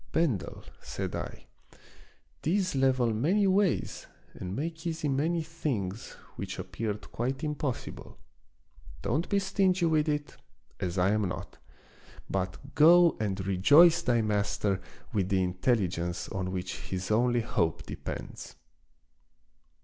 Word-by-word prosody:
" - - -27
Bendel," 155 - 0 0.2
said - - -4
I, - - -6 0.5
" - - -28
these 185 +3 +1
level 130 -3 +3
many 175 - +2
ways 195 -1 +1 0.3
and 90 +1 -6
make 160 +4 -4
easy 160 -2 -2
many 160 +5 +1
things 120 - -3 0.2
which - - -5
appeared 105 -2 -4
quite 130 +4 -2
impossible; 150 -4 -4 0.9
don't 150 +8 0
be 200 - +2
stingy 190 -2 +2
with 155 -1 +2
it, 150 0 -2 0.4
as 90 -1 -3
I 90 +2 +3
am 105 -3 +1
not, - - -7 0.7
but 95 +9 -4
go 170 +2 +7
and 100 -3 -2
rejoice 145 - +6
thy 120 -2 +2
master 100 -2 0 0.3
with 95 -3 0
the 95 -2 +2
intelligence 90 -3 0
on 95 -1 -3
which 95 0 -4
his 95 +2 -3
only 120 +2 +3
hope 80 -7 0
depends." - - -7
125 Hz, 125 wpm, -29 LUFS, 95-160 Hz, 0.9 s, go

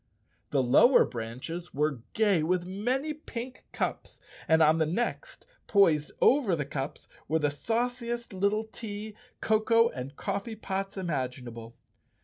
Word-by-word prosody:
The 135 -2 +2
lower 140 - +6
branches 130 +10 -6
were 150 -2 0
gay 205 -6 +3
with 175 +2 0
many 250 +11 -1
pink 255 -4 -8
cups - - -3 0.3
and 160 0 +5
on 155 +1 +4
the 160 - +2
next, 240 - -3 0.2
poised 165 -8 +4
over 250 -10 +4
the 145 -3 -2
cups, 140 0 -5 0.2
were 160 - +2
the 150 -2 +1
sauci¬ 235 - -2
est 235 -2 -4
little 200 +3 +1
tea, 215 -1 -7 0.3
cocoa 230 +2 +3
and 130 - -7
coffee 220 +9 -3
pots 195 -2 -4
imaginable. 125 -9 -4
190 Hz, 135 wpm, -29 LUFS, 150-225 Hz, 0.3 s, lower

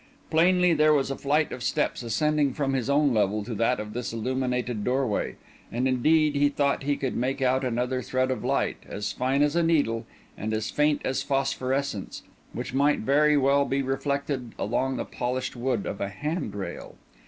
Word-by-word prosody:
Plainly 180 +2 +4
there 155 0 +4
was 135 -1 0
a - - -2
flight 150 +3 +1
of 125 - -6
steps 130 - 0
ascending 145 +4 +1
from 135 -2 0
his 130 -1 -1
own 140 -1 +3
level 105 -1 +1
to 115 +3 -5
that 115 +3 +1
of 105 0 -6
this 120 +1 -3
illuminated 125 -1 -2
doorway; 125 -3 0 0.4
and 125 +3 0
indeed 150 +4 +3
he 145 0 +4
thought 140 -1 0
he 140 0 0
could 130 -2 -2
make 130 +3 -1
out 130 0 +2
another 125 +1 -1
thread 130 +2 0
of 130 - -3
light, - - 0
as 100 0 -3
fine 135 +3 +1
as 150 +2 +1
a 170 - +3
needle 145 -9 +1 0.3
and 110 +1 -3
as 110 +1 -2
faint 150 0 +1
as 130 - 0
phosphorescence, 135 -4 -2 0.3
which - - -5
might 145 +2 +2
very 150 +5 +4
well 140 +1 +4
be 135 0 -1
reflected 135 -2 -2
along 125 +5 -1
the - - -3
polished 130 +2 -3
wood 120 -3 -1
of 100 - -5
a 100 - -1
handrail. 105 - -5
130 Hz, 185 wpm, -26 LUFS, 120-145 Hz, 0.4 s, Plainly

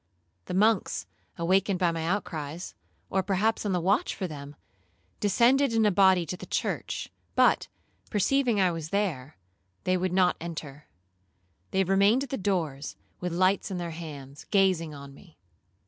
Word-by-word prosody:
The - - -4
monks, 215 +1 +2 0.3
awakened 190 +3 +2
by 175 -2 +2
my 165 -1 -3
outcries, 170 -4 -3 0.4
or 190 - +2
perhaps 205 +3 0
on - - 0
the 180 - +1
watch 190 +5 +1
for 190 - -3
them, 145 -2 -9 0.6
descended 240 +6 +3
in 225 -1 +3
a 210 - +4
body 190 -2 +4
to 170 - -4
the - - -10
church, - - -3 0.2
but, - - +4 0.4
perceiving 240 +1 +2
I 185 -2 +4
was 165 -2 -5
there, 160 -9 -2 0.5
they 185 0 +2
would 185 0 -1
not 180 -1 +3
enter,—they 95 - -7
remained 200 +7 +3
at 280 - -7
the 270 - -1
doors, 165 -8 -2 0.2
with 180 -1 -3
lights 185 +3 +2
in 190 - -3
their 170 -1 -4
hands, 145 -4 -9
gazing 185 -6 +2
on 140 -1 -10
me. 165 +3 -18
180 Hz, 155 wpm, -28 LUFS, 155-200 Hz, 0.6 s, a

